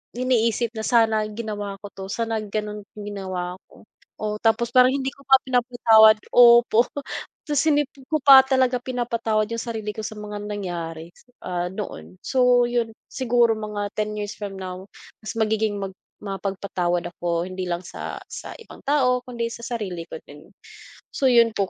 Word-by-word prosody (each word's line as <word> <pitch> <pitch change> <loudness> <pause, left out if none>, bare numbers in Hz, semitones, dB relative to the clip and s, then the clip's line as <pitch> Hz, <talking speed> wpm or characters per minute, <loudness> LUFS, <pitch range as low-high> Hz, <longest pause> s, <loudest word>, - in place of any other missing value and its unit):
iniisip 235 -2 +1
na 220 - -5
sana 220 -3 +3
ginawa 210 -2 -5
ko 205 - -8
'to 190 - -9
sana 225 0 -1
ganon 210 0 -4
ginawa 190 -3 -5
ko, - - -18 0.4
o 210 0 -2
tapos 235 +1 +2
parang 255 0 +6
hindi 270 -1 -2
ko 280 - -20
pa 265 0 +8
pinapatawad 240 -4 +5 0.2
opo 240 -1 +6 0.6
tas 295 -1 +1
hindi 295 -1 +4
ko 285 +3 -3
pa 275 -2 +10
talaga 260 -2 +2
pinapatawad 230 -4 -1
yung 230 - -2
sarili 220 -3 -4
ko - - -7
sa 215 - -5
mga 210 0 -6
nangyari 170 -5 -5 0.3
ah, 180 -1 -2
noon 90 - -7
so 250 -1 +4
yun 235 -2 -1 0.2
siguro 240 -2 +2
mga 210 -1 -4
10 215 0 -2
years 205 -1 -4
from 200 -2 -6
now 185 +1 -7 0.4
mas 215 - -6
magiging 220 -1 +1
mag 195 -1 -4 0.3
mapagpatawad 190 -3 -2
ako 170 0 -1
hindi 185 -1 -5
lang 175 +1 -3
sa - - -6
sa - - -8
ibang - - -14
tao 255 -3 +2
kundi 240 -2 -4
sa - - -9
sarili 210 -8 -4
ko - - -6
din. 150 +4 -15 0.6
So 265 - +2
yun 235 -2 +5
po 195 -3 -1
220 Hz, 165 wpm, -23 LUFS, 195-240 Hz, 0.6 s, pa